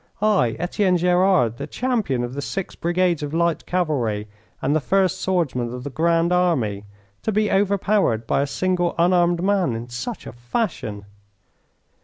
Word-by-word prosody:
I, 200 - +2
Etienne 180 +2 +1
Gerard, 180 - +3
the - - -5
champion 220 - -1
of 120 +1 -4
the 140 - -4
six 190 +6 -4
brigades 175 -1 0
of 145 +1 -4
light 170 -2 0
cavalry 125 -13 -1 0.3
and 140 +3 0
the - - +3
first 185 +3 +1
swordsman 145 -10 0
of 125 0 -6
the 145 - -5
Grand 165 +3 +2
Army, 125 - +1 0.4
to 220 - -1
be 215 0 +1
overpowered 195 - +1
by 125 - +1
a 140 - 0
single 180 +2 0
unarmed 175 0 +3
man 190 - +1
in 115 +2 -6
such 160 - -5
a - - -7
fashion! 120 - -3
170 Hz, 160 wpm, -22 LUFS, 125-185 Hz, 0.4 s, Gerard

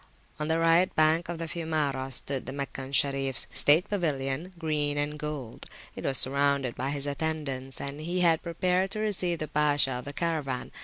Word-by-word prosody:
On 150 - -1
the 160 +1 +1
right 165 +2 +4
bank 160 +2 +3
of 170 - -3
the 165 - -4
Fiumara 150 -5 -2
stood 135 +1 -3
the - - -4
Meccan 135 -1 -5
Sharifs 135 -1 +1
state 155 +5 +5
pavilion, 155 -3 -2
green 150 -3 0
and 150 +1 -1
gold: 145 -6 -6 0.3
it - - -7
was 135 -1 +2
surrounded 140 -1 +3
by 130 +2 -3
his 140 0 -3
attendants, 140 -3 -3
and 140 +2 -5
he 175 +3 -1
had 165 -2 +4
prepared 180 +3 0
to 215 - -4
receive 185 -5 -1
the 155 - -4
Pasha 145 -2 +2
of 125 -1 -4
the 140 - -6
Caravan. 150 -6 -2
150 Hz, 185 wpm, -28 LUFS, 135-165 Hz, 0.3 s, state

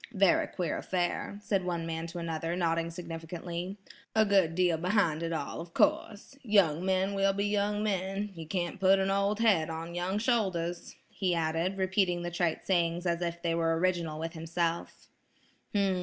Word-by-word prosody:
"Very 195 -2 +4
queer 175 -3 -2
affair," 180 +2 -2
said 195 -3 0
one 170 -2 -2
man 165 0 -3
to 170 +1 -8
another, 165 0 -2
nodding 165 -1 0
significantly. 170 +2 -6 0.4
"A 220 0 +5
good 190 -5 +3
deal 175 -2 +3
behind 175 -2 +1
it 165 0 -2
all, 160 -1 -3
of 170 0 -11
course. 220 +5 +1
Young 190 - +3
men 190 +1 +1
will 195 0 +2
be 200 +1 -1
young 205 0 0
men; 195 0 -1
you 165 -3 -8
can't 175 +2 -2
put 195 0 +5
an 195 0 +1
old 200 +2 +1
head 190 -9 +3
on 165 +1 -5
young 180 +3 -1
shoulders," 190 -7 -1
he 185 -3 -1
added, 165 +3 0
repeating 185 -2 +1
the 175 - -3
trite 170 -2 -1
sayings 175 -1 +1
as 170 0 0
if 170 0 -3
they 170 -1 +1
were 165 -1 +1
original 170 -3 0
with 165 +1 -4
himself. 165 +1 -3
175 Hz, 170 wpm, -30 LUFS, 165-195 Hz, 0.4 s, A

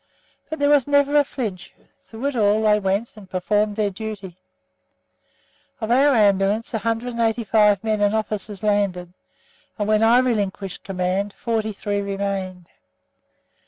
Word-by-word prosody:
But 315 - -4
there 285 0 +2
was 285 -3 +4
never 285 0 +3
a - - +4
flinch; 220 -10 -6 0.3
through 225 +4 -8
it 285 -1 -1
all 215 -1 +2
they 210 -1 +4
went, 200 +3 -1
and 200 -3 -14
performed 205 +3 0
their 210 -1 0
duty. 195 -3 -7 1.4
Of 220 0 -3
our 275 +2 +4
Ambulance 205 +1 +2
185 225 -2 +1
men 215 -1 0
and 205 +1 +2
officers 210 -2 -3
landed, 195 -4 0 0.6
and 205 -2 -2
when 215 0 +3
I 225 +2 +5
relinquished 205 -6 -1
command, 190 +2 -2
43 215 -3 -2
remained. 195 -2 -4
210 Hz, 130 wpm, -22 LUFS, 195-230 Hz, 1.4 s, I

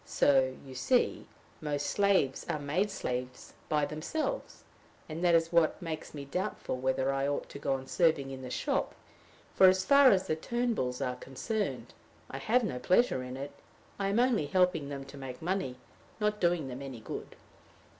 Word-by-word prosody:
So, 130 -2 +3
you 135 - -10
see, 245 - +1 0.3
most 145 -2 -2
slaves 195 -10 +2
are - - 0
made 150 +8 0
slaves 125 -9 -4 0.2
by 150 -1 +2
themselves; 310 - -4 0.4
and 160 +2 -5
that 175 -1 +5
is 165 0 +2
what 170 -2 +3
makes 160 -2 -6
me 140 -1 -6
doubtful 180 -1 -3
whether 130 +1 0
I 135 0 0
ought 145 - -2
to 140 - -8
go 140 -1 0
on 135 0 -3
serving 150 -3 +2
in 130 -1 -7
the 130 - -7
shop; - - -1 0.6
for, 190 - +7
as 185 0 +4
far 280 +2 +7
as 190 -4 +3
the 155 - 0
Turnbulls 220 - -1
are 125 0 -4
concerned, 200 - -3 0.4
I - - -5
have 245 +3 +2
no 175 - -2
pleasure 180 - +3
in 125 0 -6
it; 140 +1 -5 0.5
I 195 - 0
am 200 +4 +2
only 240 - +2
helping 180 -4 +2
them 140 -1 -5
to 135 +1 -11
make 130 -2 -7
money, 175 -7 -2 0.4
not 210 0 0
doing 170 -5 +2
them 130 +1 -6
any 135 -4 -7
good." - - -7
150 Hz, 180 wpm, -31 LUFS, 135-190 Hz, 0.6 s, for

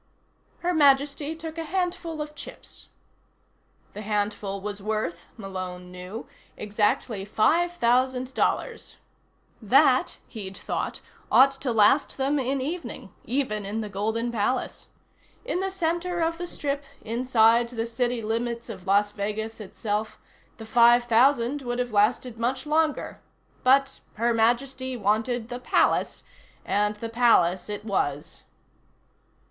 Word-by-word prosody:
Her 355 +1 0
Majesty 285 0 +3
took 320 0 -7
a - - -2
handful 335 -2 -2
of 300 0 -11
chips. 295 - -11 1.1
The 210 - -7
handful 205 -1 -2
was 205 +1 -6
worth, 210 -5 -3
Malone 185 -3 -6
knew, 180 +5 -7 0.3
exactly 210 0 0
five 330 - +2
thousand 255 -2 +1
dollars. - - -1 0.7
That, - - +4
he'd 195 -4 -7
thought, - - -4 0.3
ought 270 +1 +7
to 270 -1 -3
last 225 +6 +4
them 280 +2 +1
an 265 +1 -1
evening, 330 +6 -5
even 245 -6 -1
in 210 +3 -3
the 210 - -5
Golden 220 +4 -2
Palace. 235 +3 -2 0.6
In 420 -7 -1
the 385 +1 -1
center 350 -1 -1
of 330 +1 0
the 350 - -4
strip, 285 -4 -3 0.2
inside 235 0 +3
the 230 -2 -3
city 240 0 -1
limits 235 +2 -2
of 190 -4 -9
Las 205 +1 +3
Vegas 215 +2 -4
itself, 210 +1 -3 0.4
the 225 - -9
five 240 +1 +5
thousand 240 +3 +3
would 245 -2 -3
have 245 -1 -2
lasted 225 +3 +1
much 255 +3 -1
longer 310 0 0 0.4
but 270 +1 +3 0.2
Her 235 +2 +1
Majesty 255 +3 0
wanted 225 +3 0
the 245 - -5
Palace, - - +1 0.4
and 210 +1 +1
the 230 +2 -5
Palace 220 -6 +3
it 210 +1 -5
was. 150 -8 -2
235 Hz, 130 wpm, -26 LUFS, 210-275 Hz, 1.1 s, ought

